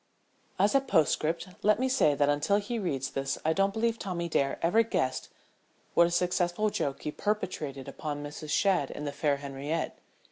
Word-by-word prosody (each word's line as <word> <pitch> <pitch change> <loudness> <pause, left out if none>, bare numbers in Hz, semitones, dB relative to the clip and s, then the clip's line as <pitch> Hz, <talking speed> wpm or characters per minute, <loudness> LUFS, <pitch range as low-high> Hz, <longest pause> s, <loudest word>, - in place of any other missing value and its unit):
As 200 +2 +3
a 275 - +5
postscript 165 - +1
let 210 +1 +3
me 260 - +2
say 250 - +3
that 145 0 +2
until 145 +8 +2
he 215 +3 -3
reads 135 -9 -2
this 135 0 -2
I 160 - +3
don't 195 +3 +2
believe 230 +2 0
Tommy 175 -4 -3
Dare 140 -4 0
ever 175 +7 +4
guessed 130 - -1 0.6
what 170 - +6
a - - -2
successful 180 +3 +1
joke 140 -7 -2
he 150 - -2
perpetrated 155 -10 -3
upon 145 -1 -5
Mrs. 150 +1 -7
Shadd 175 -3 +2
and 150 - -6
the 145 - -2
fair 145 -1 0
Henriette. 140 +3 -4
170 Hz, 180 wpm, -29 LUFS, 145-200 Hz, 0.6 s, what